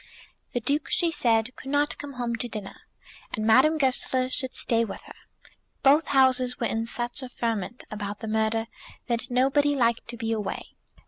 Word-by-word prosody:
The 245 - 0
Duke, 280 +3 -1
she 340 -1 +2
said, 235 -4 +1
could 270 - -9
not 290 +1 +1
come 290 -1 -7
home 240 -2 -2
to 245 - -3
dinner, 210 -3 -6 0.6
and 215 - -3
Madame 265 +8 +5
Goesler 260 -2 +1
should 260 -1 -2
stay 230 -1 +2
with 225 - -6
her. - - -12 0.7
Both 285 +3 +5
Houses 255 -2 +3
were 235 - 0
in 225 0 -1
such 240 +2 -2
a 255 - -7
ferment 230 -1 -3
about 205 -1 -5
the 220 - -6
murder, 220 +1 +1 0.4
that 235 -2 -2
nobody 275 +3 +3
liked 235 -3 +1
to 235 0 -6
be 225 0 -2
away. 215 -3 -3
245 Hz, 180 wpm, -26 LUFS, 225-270 Hz, 0.7 s, Madame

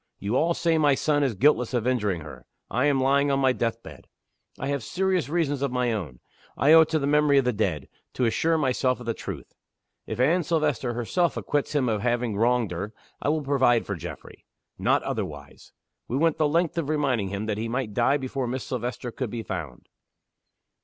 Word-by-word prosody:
You 100 +4 -2
all 170 +5 +2
say 165 -2 +1
my 145 -3 +4
son 145 +1 +1
is 130 -6 0
guiltless 125 +1 +2
of 120 -2 0
injuring 105 -9 0
her. 75 -1 -11 0.2
I 125 - +1
am 145 -2 +3
lying 140 +2 +3
on 135 - +2
my 130 -1 +3
death 115 -1 -2
bed. 70 -4 -12 0.5
I - - -4
have 140 -1 -1
serious 185 - 0
reasons 150 -4 0
of 140 -2 0
my 125 -2 0
own 80 - -5 0.4
I 140 +6 +5
owe 165 - +9
it 160 - +2
to 160 - +1
the 140 - -1
memory 150 0 +3
of 135 - +3
the 125 - +1
dead 90 -10 -1 0.3
to 125 - 0
assure 160 +8 +1
myself 130 -3 +1
of 120 - -9
the 115 - -1
truth. - - -8 0.5
If - - -5
Anne 160 +8 +3
Silvester 150 -7 0
herself 165 +9 0
acquits 145 +1 -2
him 135 -3 +2
of 110 -3 0
having 120 -2 0
wronged 115 -1 +1
her, 100 +5 -5 0.3
I - - 0
will 155 0 0
provide 130 -4 +2
for 100 - -3
Geoffrey. 85 - -9 0.4
Not - - +2
otherwise.' - - -6 0.4
We 125 - -2
went 160 +1 +2
the 155 -2 +3
length 170 +2 +1
of 150 -3 -3
reminding 135 -9 0
him 100 +2 -4
that 105 -1 -2
he 115 +1 -3
might 120 -3 -2
die 125 +6 +3
before 130 -1 -3
Miss 130 +2 -3
Silvester 125 -2 -4
could 125 0 -4
be 115 +1 -5
found. 80 - -6
130 Hz, 210 wpm, -25 LUFS, 115-145 Hz, 0.5 s, owe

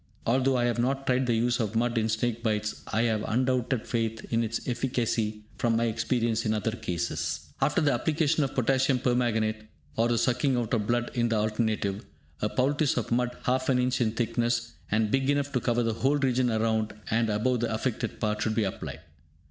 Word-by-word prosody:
Although 130 +2 +2
I 120 - +1
have 120 -1 0
not 135 +3 0
tried 130 0 +1
the 120 - +2
use 120 +1 +1
of 110 -1 -2
mud 120 +1 +1
in 110 -1 +1
snake 115 +1 -1
bites, 105 -2 -1
I 110 +2 +1
have 110 -2 +1
unbounded 125 0 0
faith 115 -1 -2
in 115 +1 +3
its 115 0 -3
efficacy 115 -4 -1 0.2
from 115 -1 +2
my 115 - +2
experience 115 0 0
in 110 -1 +1
other 110 +1 -1
cases. 90 -6 -3
After - - +2
the 145 -3 +3
application 155 +3 +1
of 135 - -3
Potassium 130 +1 +2
Permanganate 110 -3 0 0.3
(or 115 - +3
the 120 -1 +1
sucking 125 +3 +2
out 120 -1 -2
of 115 - +3
the 105 - -6
blood, 120 0 0
in 120 -1 +1
the 115 - +1
alternative,) 105 -2 0 0.4
a 105 - +1
poultice 140 +4 +1
of 120 - -2
mud 125 +1 0
half 130 +1 0
an 130 - +4
inch 125 0 +1
in 110 -2 +1
thickness, 115 0 0 0.2
and 105 0 +1
big 135 0 +1
enough 145 0 +1
to 130 - +1
cover 120 0 +1
the 115 -1 0
whole 135 +6 +1
region 130 -2 +2
around 110 -1 0 0.2
and 115 0 +2
above 115 +4 +1
the 115 0 -1
affected 115 0 -2
part, 105 -1 -1
should 110 0 0
be 115 - +2
applied. 95 - -5
120 Hz, 205 wpm, -28 LUFS, 110-125 Hz, 0.4 s, an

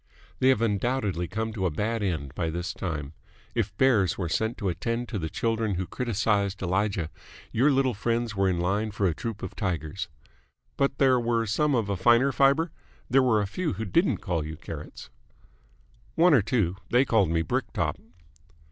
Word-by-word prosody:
"They 130 - +4
have 125 -4 +3
undoubtedly 105 -5 0
come 110 +4 -3
to 95 -4 0
a - - 0
bad 110 +8 -2
end 80 -9 -2
by 80 0 -2
this 85 +1 -3
time. 75 -5 -4 0.4
If 105 -3 -2
bears 110 -10 +3
were 90 -4 -2
sent 110 +7 -1
to 100 - -2
attend 115 +8 -2
to 105 - -3
the 80 -1 -3
children 115 +2 -1
who 90 +1 -2
criticised 100 -4 -1
Elijah, 95 -2 0 0.4
your 130 +6 +3
little 135 -2 +2
friends 115 +1 -1
were 95 -1 +2
in 90 - 0
line 100 +5 0
for 105 -1 -1
a 85 - +2
troupe 110 +5 -5
of - - -6
tigers. 90 -3 -3 0.7
But 140 -1 0
there 130 -2 +4
were 115 -1 +1
some 145 +7 +1
of 115 -4 0
a 100 - -1
finer 120 +7 +4
fibre? 140 +5 +3 0.4
There 135 +2 +6
were 120 -5 +3
a - - 0
few 160 - -2
who 110 +4 -4
didn't 170 - +1
call 85 -5 0
you 80 +1 -6
Carrots?" 75 -2 -9 1.0
"One 170 0 +5
or 130 - +6
two. 100 -4 0
They 125 +3 +4
called 105 -9 +3
me 80 0 +1
Brick 75 - -2
Top." - - -1
105 Hz, 190 wpm, -27 LUFS, 90-120 Hz, 1.0 s, There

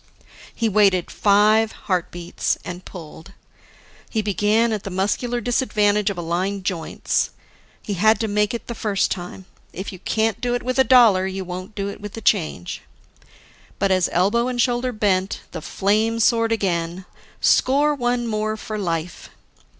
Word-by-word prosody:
He 230 - 0
waited 195 -4 +3
five 215 +2 +3
heartbeats, 175 -2 -2
and 180 +1 -7
pulled. 170 +1 -11 0.8
He 220 -2 -1
began 210 +3 +2
at 210 - -2
the 195 - -6
muscular 210 +6 -1
disadvantage 210 -4 +1
of 200 - -4
aligned 180 +4 -2
joints. 180 -4 -1 0.5
He 205 - -3
had 215 +4 +3
to 220 - 0
make 210 0 +1
it 235 - -6
the 235 - -5
first 205 -3 0
time; 180 +1 -6 0.3
if 190 +2 -6
you 185 - -10
can't 220 +3 -1
do 245 0 0
it 245 - -3
with 255 +1 -1
a - - +7
dollar, 225 -7 +5
you 190 0 -4
won't 185 +4 -7
do 200 -1 -2
it 200 - -7
with 205 -1 -7
the 225 - -7
change. 155 - 0 1.0
But 195 0 +1
as 185 -2 +2
elbow 210 +7 +2
and 250 -1 -3
shoulder 245 +1 +1
bent, 200 -3 0
the - - -6
flame 215 +3 0
soared 230 0 +3
again: 180 -4 -1 0.3
Score 290 +3 +3
one 245 -3 -1
more 215 -1 -2
for 215 0 -5
life! 170 -3 -3
205 Hz, 160 wpm, -22 LUFS, 185-225 Hz, 1.0 s, a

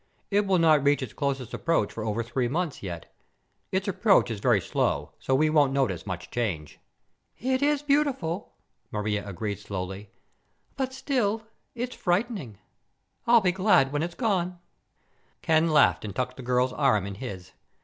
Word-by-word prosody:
It 200 0 +2
will 190 -1 +3
not 155 -4 +4
reach 145 -1 +3
its 125 - -7
closest 135 -4 -2
approach 165 -11 0
for 115 - -5
over 110 +1 -1
three 120 +1 -1
months, 160 +3 -2
yet. 85 -4 -7 0.6
Its 190 +2 -1
approach 195 - +3
is 110 - -4
very 120 -1 +3
slow 85 - -1
so 130 - +1
we 155 +3 +3
won't 145 -3 +3
notice 105 -11 0
much 90 -2 -5
change." 95 -11 -3 0.6
"It 260 +1 0
is 290 0 +2
beautiful," 280 - 0 0.3
Maria 105 -1 -2
agreed 100 +1 -4
slowly, 95 +1 -6 0.7
"but, 265 -1 -2
still, 240 -5 -1 0.3
it's 245 +1 -4
frightening. 180 - -1 0.7
I'll 235 -1 +7
be 185 -2 +3
glad 185 -8 +3
when 145 +1 -1
it's 170 +1 -3
gone." 185 -7 0 0.9
Ken 160 0 +3
laughed 155 - +4
and 105 -2 -6
tucked 125 0 -2
the - - -7
girl's 125 +1 +1
arm 130 -10 +2
in 100 - -5
his. 95 -4 -7
140 Hz, 160 wpm, -27 LUFS, -, 0.9 s, I'll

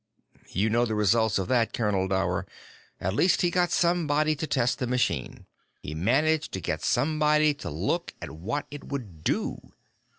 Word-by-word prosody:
"You 105 +4 0
know 120 +2 +3
the 110 - -2
results 110 +1 +3
of 95 -2 -2
that, 115 -3 +2
Colonel 100 -4 0
Dower. 95 0 0 0.5
At 95 +1 -1
least 180 - +3
he 175 - +2
got 175 0 +2
somebody 155 -3 +2
to 155 +2 -4
test 125 -3 +1
the 125 - -1
machine. 125 +1 -1 0.4
He 75 - -5
managed 145 - +1
to 95 - -2
get - - -3
somebody 150 +2 +3
to 145 - -7
look 75 - -2
at - - -7
what 100 - -4
it 145 0 -8
would 105 - -6
do. - - -1
125 Hz, 170 wpm, -27 LUFS, 100-150 Hz, 0.5 s, know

